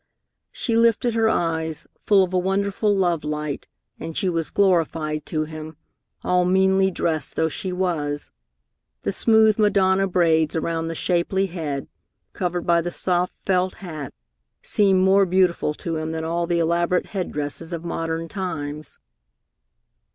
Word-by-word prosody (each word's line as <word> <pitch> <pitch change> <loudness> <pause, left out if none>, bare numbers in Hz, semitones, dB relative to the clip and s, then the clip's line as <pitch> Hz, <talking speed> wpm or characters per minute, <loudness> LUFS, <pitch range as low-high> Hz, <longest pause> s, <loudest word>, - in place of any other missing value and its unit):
She 230 - -2
lifted 230 +1 +3
her 225 -1 +3
eyes, 160 -5 -1
full 200 -2 +4
of 185 0 -3
a 185 - +3
wonderful 200 +3 0
love 175 -4 +1
light, 150 -1 -4 0.3
and 165 - -6
she 190 - +1
was 165 -2 -2
glorified 165 -5 +1
to 155 -1 -1
him, 155 0 -8 0.5
all 180 0 +2
meanly 190 +1 +3
dressed 165 -4 -2
though 160 0 +1
she 185 +4 -4
was. 160 -6 -2 0.7
The - - 0
smooth 220 -1 +4
Madonna 195 -2 +3
braids 165 -3 +2
around 165 0 -1
the 165 - -4
shapely 180 +3 +1
head, 155 -7 -4 0.5
covered 180 -1 -2
by 170 -1 +3
the 175 - -3
soft 180 0 0
felt 185 -1 0
hat, 155 -7 -7 0.5
seemed 195 -3 +3
more 195 0 +5
beautiful 175 -4 +2
to 165 0 -4
him 155 +1 -3
than 160 0 -3
all 170 +1 -1
the 175 0 +1
elaborate 170 +2 +1
head 190 -3 -2
dresses 150 +3 -5
of 170 0 -5
modern 165 -1 -3
times. 155 -6 -5
175 Hz, 150 wpm, -23 LUFS, 160-190 Hz, 0.7 s, more